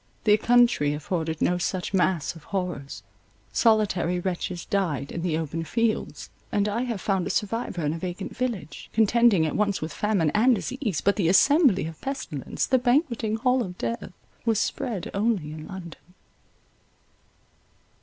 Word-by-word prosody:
The 210 -1 +6
country 235 -11 +3
afforded 160 +1 -2
no 180 0 +2
such 180 +2 -2
mass 180 -5 +1
of 165 - -14
horrors; 180 -8 -4 0.5
solitary 205 -6 +2
wretches 175 -1 -3
died 165 -9 -1
in 170 - -4
the 165 -3 0
open 165 +1 -3
fields; 230 +5 -2 0.2
and 205 0 +1
I 210 +3 -1
have 230 -5 -3
found 190 -2 0
a - - -3
survivor 210 -6 -2
in 150 - 0
a 165 - -5
vacant 185 +2 -5
village, 240 -10 -4
contending 225 -5 +4
at 155 - -2
once 205 -2 +1
with 155 - -5
famine 195 -8 +1
and 240 +4 +4
disease; 225 - -3
but 200 - +2
the 175 -5 +2
assembly 265 - +5
of 160 -1 -8
pestilence, 265 - -3
the 260 - +3
banqueting 245 -4 +1
hall 250 +2 +2
of 180 -5 -5
death, 115 +9 -4 0.3
was 225 -3 +2
spread 215 -7 -2
only 200 -7 0
in 155 0 -8
London. 180 -2 -10
195 Hz, 155 wpm, -25 LUFS, 165-230 Hz, 0.5 s, The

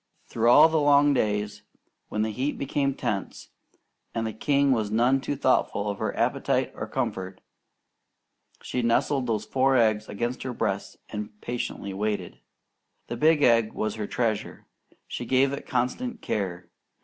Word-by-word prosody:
Through 115 0 +1
all 125 - +8
the 160 -1 +1
long 145 0 +5
days, 105 -3 -1 0.5
when 105 - -1
the 110 - -1
heat 135 +7 -2
became 140 0 0
intense, 120 -7 -4 0.7
and 115 0 -1
the 110 - -3
king 140 +4 +2
was 110 -5 +1
none 120 +5 +3
too 145 - -2
thoughtful 125 -6 +1
of 100 - -7
her - - -2
appetite - - +1
or - - -6
comfort, 95 0 -3 1.2
she 125 - -2
nestled 125 +3 +1
those 110 -2 -1
four 130 +3 +2
eggs 110 -3 +2
against 120 +5 -3
her 130 -1 -4
breast - - -2
and 105 0 -6
patiently 120 -5 -4
waited. 105 +2 -3 0.7
The - - -3
big 155 -1 +3
egg 115 -2 +4
was 110 -1 -2
her 105 -2 -4
treasure. 110 -4 -2 0.4
She - - -5
gave 135 +1 +2
it 140 - -6
constant 215 - -1
care. 90 -4 -3
120 Hz, 155 wpm, -26 LUFS, 105-135 Hz, 1.2 s, all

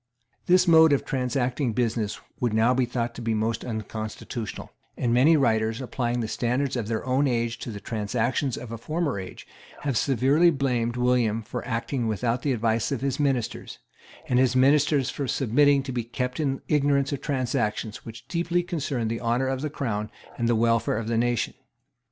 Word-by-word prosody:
This 180 +1 +5
mode 160 -2 +7
of 140 - 0
transacting 125 -1 -1
business 115 -3 -1 0.2
would 120 -3 0
now 115 +3 +4
be 130 0 +2
thought 120 -1 -3
most 110 0 -1
unconstitutional; 110 -1 -5 0.3
and 120 -1 0
many 145 +7 +5
writers, 110 -4 +1
applying 120 -2 -2
the 110 - -2
standard 125 +5 -1
of 115 -4 -2
their 110 -1 -2
own 130 +2 +2
age 120 -2 -1
to - - -6
the 105 -3 -6
transactions 115 +5 -1
of 120 -2 -8
a 115 - -6
former 155 - -2
age, 95 - -9 0.4
have 140 -3 -1
severely 140 +7 +3
blamed 125 -5 0
William 120 -3 +1
for - - -5
acting 115 +1 -2
without 115 +3 -1
the 145 - 0
advice 115 +1 0
of 135 - -2
his 135 0 -1
ministers, 130 -5 -1 0.5
and 125 - +2
his 130 -1 +3
ministers 140 0 +3
for 140 - -4
submitting 140 +3 +3
to 135 - -5
be 120 -2 -2
kept 125 +3 -4
in 135 -3 -1
ignorance 140 -2 +2
of 140 - -4
transactions 120 -6 -2
which 115 +1 -10
deeply 175 0 0
concerned 140 -9 -2
the 115 - -3
honour 120 +2 +1
of 130 0 -2
the 150 - -2
Crown 110 -7 -3 0.3
and 120 -1 0
the 120 - +3
welfare 115 -1 +2
of 110 -1 -4
the 115 - 0
nation. 120 0 0
125 Hz, 180 wpm, -26 LUFS, 115-135 Hz, 0.5 s, mode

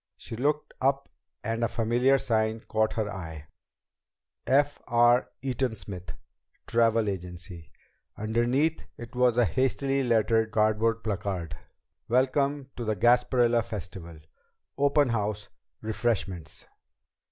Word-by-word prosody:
She - - -7
looked 145 +5 -1
up 135 +1 +1 0.3
and 115 +1 -1
a - - +3
familiar 120 +5 +2
sign 110 -3 0
caught 110 0 0
her 110 -2 -1
eye: 80 -6 -7 1.0
F. 145 +2 +2
R. 120 +1 +4
EATON 130 -3 -1
SMITH 90 -2 -8 0.5
TRAVEL 115 -1 +2
AGENCY. 90 -3 -6 0.5
Underneath 120 +9 0
it 120 +1 -10
was 125 -1 +3
a 120 - +5
hastily 135 +2 0
lettered 110 -2 +2
cardboard 110 +1 +1
placard: 95 -6 -3 0.5
WELCOME 135 +2 +1
TO 120 - -5
THE 110 -1 0
GASPARILLA 120 +2 +3
FESTIVAL. 90 -7 -8 0.6
_Open 145 -2 +3
House 105 -2 -2 0.3
Refreshments. 95 -7 -2
115 Hz, 110 wpm, -27 LUFS, 105-125 Hz, 1.0 s, a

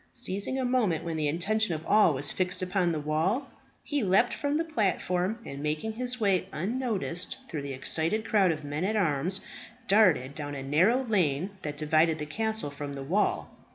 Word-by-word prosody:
Seizing 240 +1 -1
a 260 - 0
moment 235 -10 +1
when 165 -1 -3
the 155 -1 0
attention 185 +5 +1
of 155 +1 -7
all 210 -8 +4
was 140 +2 +3
fixed 185 0 -1
upon 180 -1 +1
the 160 - -2
wall, 165 - -1 0.3
he 290 -1 -1
leaped 200 +4 +3
from 285 +1 -1
the 325 - +1
platform, 200 - 0
and 140 +1 -7
making 155 +9 -2
his 250 +2 -3
way 195 -4 +1
unnoticed 200 -2 -2
through 150 - -4
the 140 -1 -5
excited 165 +10 +1
crowd 200 -4 +3
of 155 -2 -2
men 145 +3 -3
at 210 +3 0
arms, 180 0 +1 0.5
darted 180 -11 +4
down 145 -1 -5
a 135 - -5
narrow 185 - +3
lane 185 - 0
that 150 -1 -5
divided 155 +1 +2
the 150 - -4
castle 220 +1 -2
from 140 0 -6
the 135 - -6
wall. 185 +9 0
180 Hz, 190 wpm, -28 LUFS, 150-220 Hz, 0.5 s, all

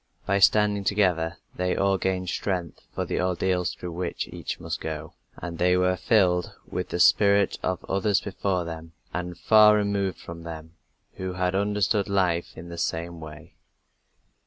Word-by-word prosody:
By 100 +1 +2
standing 105 0 +4
together 90 -5 +1 0.2
they 90 0 0
all 95 -1 +2
gained 95 -1 -1
strength 90 -5 -3
for - - -3
the - - -1
ordeals 90 0 0
through 90 - -7
which 85 +1 -3
each - - -5
must - - -5
go, 80 -1 -5 0.2
and 85 -1 -6
they 90 +1 +4
were 90 0 +2
filled 90 -2 +2
with 90 - -4
the 85 - -3
spirit 100 +2 +4
of 95 -1 -2
others 100 +1 +2
before 95 -3 -2
them 80 0 -8 0.2
and 90 0 -4
far 105 -1 +6
removed 100 -2 0
from 85 0 -9
them, 80 -1 -8 0.4
who 95 -1 -4
had 90 0 0
understood 100 +1 +1
life 90 -4 0
in 85 +1 -9
the 85 0 -7
same 85 +1 -3
way. 75 -1 -11
90 Hz, 160 wpm, -26 LUFS, 85-100 Hz, 0.4 s, far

